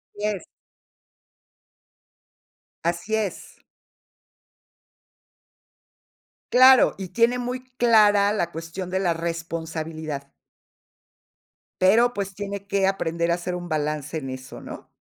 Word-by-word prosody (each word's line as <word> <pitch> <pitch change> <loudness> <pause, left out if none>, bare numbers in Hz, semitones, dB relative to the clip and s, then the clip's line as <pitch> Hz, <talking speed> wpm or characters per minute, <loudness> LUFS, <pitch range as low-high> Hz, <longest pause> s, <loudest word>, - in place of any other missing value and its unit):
Así 205 +1 -4
es. 200 -5 -3 2.4
Así 170 +5 -2
es 210 -5 -4 2.9
Claro, 255 +1 +7
y 190 -1 -5
tiene 235 +3 +2
muy 250 +1 -4
clara 210 -4 +5
la 175 -5 -1
cuestión 165 +3 -6
de 190 +1 -1
la 180 -3 +1
responsabilidad. 160 -3 -5 1.5
Pero, 230 +6 +5
pues, 195 -3 -4
tiene 200 0 -6
que 200 -1 +1
aprender 170 -3 0
a - - +4
hacer 180 +1 -3
un 175 0 -6
balance 150 -1 -2
en 135 -3 -7
eso, 130 0 -8
¿no? - - -10
185 Hz, 105 wpm, -24 LUFS, 165-205 Hz, 2.9 s, Claro